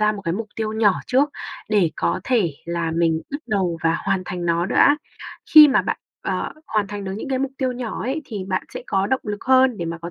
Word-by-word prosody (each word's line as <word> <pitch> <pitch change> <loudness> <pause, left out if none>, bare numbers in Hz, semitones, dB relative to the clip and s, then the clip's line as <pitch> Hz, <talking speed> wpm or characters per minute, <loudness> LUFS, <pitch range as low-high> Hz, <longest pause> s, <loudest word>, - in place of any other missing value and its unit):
ra 215 0 +3
một 200 - -7
cái 165 - 0
mục 220 +3 -4
tiêu 220 -1 -2
nhỏ 220 -2 +4
trước, 275 +3 +2 0.4
để 200 -6 +3
có - - 0
thể 220 - +1
là 170 -1 -2
mình 165 -1 +1
bắt 285 - -3
đầu 190 -7 0
và 165 0 +2
hoàn 190 - 0
thành 180 -1 -4
nó 170 +1 +1
đã. 285 +8 +4 0.6
Khi 305 -1 +11
mà 270 - +3
bạn, - - -2 0.2
ờ, - - -2
hoàn 210 -2 0
thành 205 0 -6
được 190 - -4
những 220 - -6
cái 265 -1 0
mục 270 0 -2
tiêu 260 -2 0
nhỏ 245 -3 -5
ấy 270 +6 -2
thì 210 -7 -6
bạn 185 -1 0
sẽ - - -5
có 195 0 0
động 265 +3 0
lực 205 -1 -5
hơn 260 -1 +4
để 170 - -3
mà 170 0 -4
có 170 +1 -7
210 Hz, 250 wpm, -22 LUFS, 175-255 Hz, 0.6 s, Khi